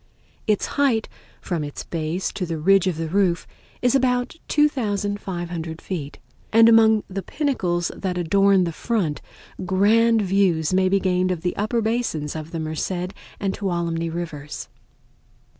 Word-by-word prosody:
Its 210 Hz, -2 st, +2 dB, 0.2 s
height 240 Hz, -6 st, +2 dB, 0.3 s
from 170 Hz, -4 st, -2 dB
its 145 Hz, -1 st, -6 dB
base 165 Hz, +2 st, -3 dB
to 190 Hz, -, -3 dB
the 165 Hz, -1 st, -3 dB
ridge 195 Hz, +4 st, +4 dB
of 175 Hz, -4 st, -1 dB
the 165 Hz, 0 st, -2 dB
roof 180 Hz, 0 st, +1 dB, 0.4 s
is 245 Hz, -, +3 dB
about 250 Hz, -1 st, +1 dB
2500 200 Hz, -, -1 dB
feet, 150 Hz, -6 st, -5 dB, 0.3 s
and 225 Hz, +1 st, +7 dB
among 220 Hz, -2 st, +6 dB
the 195 Hz, +1 st, -4 dB
pinnacles 185 Hz, -, -1 dB
that 185 Hz, -2 st, -3 dB
adorn 195 Hz, +2 st, +4 dB
the 170 Hz, -, -1 dB
front 175 Hz, -4 st, -1 dB, 0.4 s
grand 215 Hz, +4 st, +3 dB
views 185 Hz, -4 st, +2 dB
may 185 Hz, 0 st, +3 dB
be 195 Hz, +1 st, +3 dB
gained 185 Hz, -1 st, +1 dB
of 180 Hz, -3 st, -2 dB
the 180 Hz, -, -1 dB
upper 215 Hz, +3 st, 0 dB
basins 220 Hz, -11 st, -1 dB
of 155 Hz, 0 st, -6 dB
the 165 Hz, -, -4 dB
Merced 175 Hz, +4 st, -3 dB, 0.3 s
and 195 Hz, -1 st, -1 dB
Tuolumne 170 Hz, -4 st, -2 dB
Rivers. 155 Hz, -4 st, -6 dB
185 Hz, 145 wpm, -23 LUFS, 170-215 Hz, 0.4 s, and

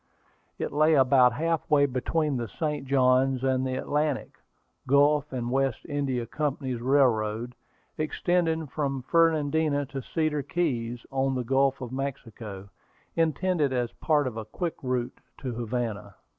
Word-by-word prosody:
It -, -, -3 dB
lay 155 Hz, +2 st, +4 dB
about 130 Hz, -2 st, +5 dB
half 165 Hz, +4 st, -1 dB
way 145 Hz, -2 st, +5 dB
between 145 Hz, +3 st, -1 dB
the 120 Hz, -1 st, -3 dB
St. 150 Hz, -, -3 dB
Johns 130 Hz, -1 st, +3 dB
and 130 Hz, 0 st, +1 dB
the 130 Hz, -, -2 dB
Atlantic, 145 Hz, +1 st, -1 dB, 0.6 s
Gulf 145 Hz, +2 st, +3 dB
and 120 Hz, -2 st, -3 dB
West 135 Hz, -2 st, 0 dB
India 135 Hz, -5 st, -1 dB
Company's 130 Hz, -2 st, -3 dB
Railroad, 120 Hz, -3 st, +2 dB, 0.5 s
extending 160 Hz, +1 st, 0 dB
from 135 Hz, -1 st, -3 dB
Fernandina 155 Hz, -2 st, +2 dB
to 135 Hz, 0 st, -6 dB
Cedar 155 Hz, +2 st, -1 dB
Keys, 125 Hz, -7 st, -2 dB
on 135 Hz, 0 st, 0 dB
the 125 Hz, -, -1 dB
Gulf 135 Hz, +2 st, +1 dB
of 125 Hz, -2 st, -6 dB
Mexico, 115 Hz, -7 st, -6 dB, 0.5 s
intended 165 Hz, -2 st, +1 dB
as 125 Hz, -2 st, -1 dB
part 150 Hz, -3 st, +2 dB
of 120 Hz, -3 st, -4 dB
a 110 Hz, -, -5 dB
quick 170 Hz, -, -3 dB
route 125 Hz, -1 st, -2 dB, 0.2 s
to 130 Hz, -, -4 dB
Havana. 115 Hz, -4 st, -3 dB
135 Hz, 140 wpm, -27 LUFS, 125-150 Hz, 0.6 s, about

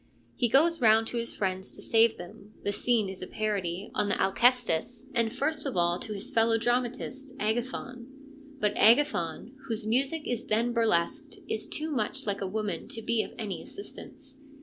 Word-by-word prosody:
He 240 Hz, -, +1 dB
goes 325 Hz, +5 st, +4 dB
round 225 Hz, -1 st, +6 dB
to 240 Hz, -, -3 dB
his 235 Hz, 0 st, -3 dB
friends 190 Hz, -1 st, -2 dB
to -, -, -5 dB
save 225 Hz, 0 st, +4 dB
him 190 Hz, +4 st, -12 dB
(the 205 Hz, -, 0 dB
scene 220 Hz, 0 st, +1 dB
is 190 Hz, -1 st, -8 dB
a 185 Hz, -, -5 dB
parody 200 Hz, -3 st, -2 dB
on 205 Hz, -1 st, 0 dB
the -, -, 0 dB
Alcestis), 245 Hz, +1 st, +2 dB
and 230 Hz, -2 st, +1 dB
first 285 Hz, +4 st, 0 dB
of 260 Hz, -, -3 dB
all 175 Hz, +1 st, +2 dB
to 215 Hz, -, -5 dB
his 200 Hz, 0 st, -6 dB
fellow 225 Hz, 0 st, +4 dB
dramatist, 250 Hz, +3 st, -2 dB
Agathon. 240 Hz, +2 st, -3 dB, 0.5 s
But 210 Hz, -4 st, +1 dB
Agathon, 230 Hz, -, +3 dB
whose 225 Hz, -2 st, -3 dB
music 275 Hz, +7 st, 0 dB
is 245 Hz, -2 st, -2 dB
then 235 Hz, +3 st, +1 dB
burlesqued, 230 Hz, -, 0 dB
is 220 Hz, -, -3 dB
too 310 Hz, +1 st, -3 dB
much 225 Hz, -7 st, -2 dB
like 200 Hz, -1 st, -2 dB
a 195 Hz, -, -1 dB
woman 210 Hz, +1 st, -3 dB
to 225 Hz, -, -6 dB
be 230 Hz, 0 st, +2 dB
of -, -, -7 dB
any 210 Hz, -6 st, -4 dB
assistance. 275 Hz, -8 st, -11 dB
225 Hz, 180 wpm, -29 LUFS, 205-255 Hz, 0.5 s, round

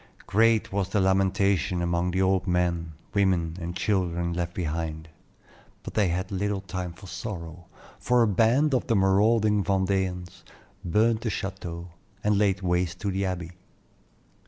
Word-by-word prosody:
Great 115 Hz, +1 st, +3 dB
was 100 Hz, -1 st, 0 dB
the 105 Hz, -, +1 dB
lamentation 95 Hz, -1 st, +2 dB
among 85 Hz, +1 st, 0 dB
the 95 Hz, +2 st, +1 dB
old 95 Hz, 0 st, +1 dB
men, 85 Hz, -2 st, 0 dB, 0.2 s
women, 90 Hz, -5 st, +1 dB
and 85 Hz, +1 st, -5 dB
children 85 Hz, -4 st, 0 dB
left 85 Hz, 0 st, -3 dB
behind; 80 Hz, -2 st, -3 dB, 0.7 s
but -, -, -7 dB
they 105 Hz, -3 st, +2 dB
had 90 Hz, +3 st, -2 dB
little 100 Hz, +1 st, -1 dB
time 90 Hz, -1 st, -5 dB
for 90 Hz, +3 st, -14 dB
sorrow, 85 Hz, -2 st, -7 dB, 0.3 s
for 125 Hz, -1 st, +3 dB
a -, -, +3 dB
band 115 Hz, +9 st, +3 dB
of 130 Hz, -, 0 dB
the 115 Hz, -, +2 dB
marauding 105 Hz, +2 st, +3 dB
Vendeans 95 Hz, -2 st, -1 dB, 0.4 s
burned 110 Hz, +5 st, +2 dB
the 115 Hz, -, -1 dB
chateau, 90 Hz, -4 st, -5 dB, 0.3 s
and 105 Hz, 0 st, +2 dB
laid 100 Hz, -1 st, +1 dB
waste 90 Hz, -1 st, 0 dB
the 100 Hz, -1 st, -1 dB
Abbey. 90 Hz, -3 st, -3 dB
95 Hz, 145 wpm, -26 LUFS, 85-100 Hz, 0.7 s, Great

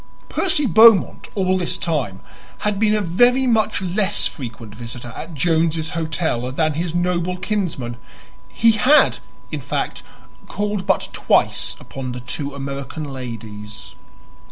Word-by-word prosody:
Percy 320 Hz, -6 st, +2 dB
Beaumont 220 Hz, -1 st, +6 dB
all 185 Hz, -2 st, +1 dB
this 175 Hz, -, -1 dB
time 130 Hz, -, -2 dB, 0.4 s
had 210 Hz, -1 st, 0 dB
been 215 Hz, -1 st, +3 dB
a 210 Hz, -, +1 dB
very 245 Hz, +9 st, +3 dB
much 220 Hz, -5 st, +1 dB
less 195 Hz, +2 st, 0 dB
frequent 115 Hz, -5 st, -6 dB
visitor 120 Hz, +1 st, -8 dB
at 165 Hz, 0 st, -7 dB
Jones's 160 Hz, 0 st, +1 dB
Hotel 160 Hz, -7 st, -2 dB
than 155 Hz, +3 st, +1 dB
his 165 Hz, +2 st, -3 dB
noble 180 Hz, 0 st, 0 dB
kinsman; 180 Hz, -, -2 dB, 0.5 s
he 230 Hz, 0 st, +4 dB
had, 255 Hz, +8 st, +4 dB, 0.3 s
in -, -, -3 dB
fact, -, -, -3 dB, 0.5 s
called 205 Hz, -1 st, -2 dB
but 190 Hz, -, +1 dB
twice -, -, +1 dB
upon 130 Hz, -2 st, -6 dB
the 125 Hz, -, -5 dB
two 140 Hz, +3 st, -5 dB
American 140 Hz, +2 st, -5 dB
ladies. 110 Hz, -4 st, -8 dB
165 Hz, 130 wpm, -21 LUFS, 130-205 Hz, 0.5 s, Beaumont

